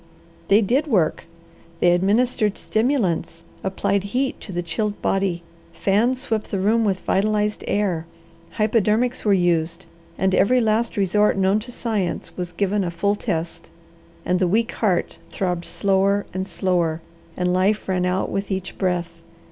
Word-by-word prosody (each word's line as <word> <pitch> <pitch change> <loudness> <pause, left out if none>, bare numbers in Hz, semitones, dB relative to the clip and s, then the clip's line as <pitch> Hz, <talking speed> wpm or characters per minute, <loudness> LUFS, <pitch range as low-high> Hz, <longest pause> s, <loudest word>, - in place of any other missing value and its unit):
They 205 +3 +5
did 265 +9 +1
work. 185 - +1 0.5
They 175 - +4
administered 210 +4 +2
stimulants; 215 - 0 0.2
applied 195 +1 0
heat 270 0 -1
to - - -8
the 175 -1 -2
chilled 205 +4 -2
body; 190 -3 0 0.3
fans 235 +6 +1
swept 220 -1 -2
the 200 - -2
room 215 +4 +2
with 195 -3 0
vitalized 210 +1 0
air; 180 -6 0 0.5
hypodermics 220 +3 +1
were 210 - +2
used; 170 -2 +1 0.3
and 190 0 +1
every 250 +7 +4
last 225 0 +1
resort 205 +1 +2
known 195 +2 +3
to 240 +3 -8
science 215 -7 -2
was 180 -1 -4
given 200 +2 0
a 175 - -1
full 200 +5 0
test, 165 -4 -4 0.6
and 180 0 +1
the 185 - +2
weak 225 +6 +1
heart 195 -6 -1
throbbed 180 -3 -2
slower 200 0 +1
and 190 +1 -3
slower, 170 -3 0 0.4
and 180 0 +1
life 195 +4 +1
ran 185 -1 0
out 185 +1 -1
with 195 0 -2
each 190 -2 -4
breath. 175 -3 -2
195 Hz, 150 wpm, -22 LUFS, 180-215 Hz, 0.6 s, They